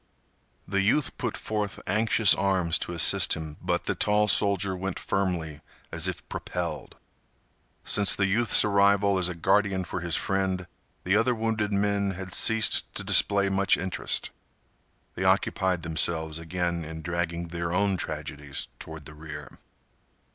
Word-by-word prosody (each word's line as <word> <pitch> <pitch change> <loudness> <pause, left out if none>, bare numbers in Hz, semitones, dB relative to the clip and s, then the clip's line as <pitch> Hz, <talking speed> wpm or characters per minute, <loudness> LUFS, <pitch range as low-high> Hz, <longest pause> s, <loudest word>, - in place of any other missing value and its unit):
The 100 0 0
youth 120 +9 +1
put 120 -3 -3
forth 105 -2 -4
anxious 110 +1 +3
arms 95 -4 +1
to - - -3
assist 85 - +3
him, 80 -2 -7
but 90 0 -1
the - - -1
tall 105 0 +2
soldier 100 -1 +2
went 95 0 -4
firmly 85 -6 -2 0.3
as - - 0
if - - -5
propelled. 85 -4 -5 0.9
Since 100 -1 +4
the 100 - +1
youth's 105 +3 +4
arrival 100 -1 +3
as 90 -1 +1
a 90 - -5
guardian 95 +2 +1
for 90 - -5
his 85 -1 -1
friend, 95 -2 -1 0.4
the 95 +2 +1
other 120 +3 +2
wounded 110 -2 -1
men 100 -1 0
had 95 -1 -8
ceased 110 -1 +3
to - - -5
display 100 -1 +3
much 95 0 +2
interest. 95 0 -3 0.8
They - - -4
occupied 90 -3 +1
themselves 80 -1 -1
again 85 0 -3
in 80 +1 -8
dragging 85 0 -3
their 85 0 -4
own 100 +2 +1
tragedies 75 -4 -4
toward 80 -2 -9
the 75 - -10
rear. 75 0 -10
95 Hz, 145 wpm, -26 LUFS, 85-100 Hz, 0.9 s, Since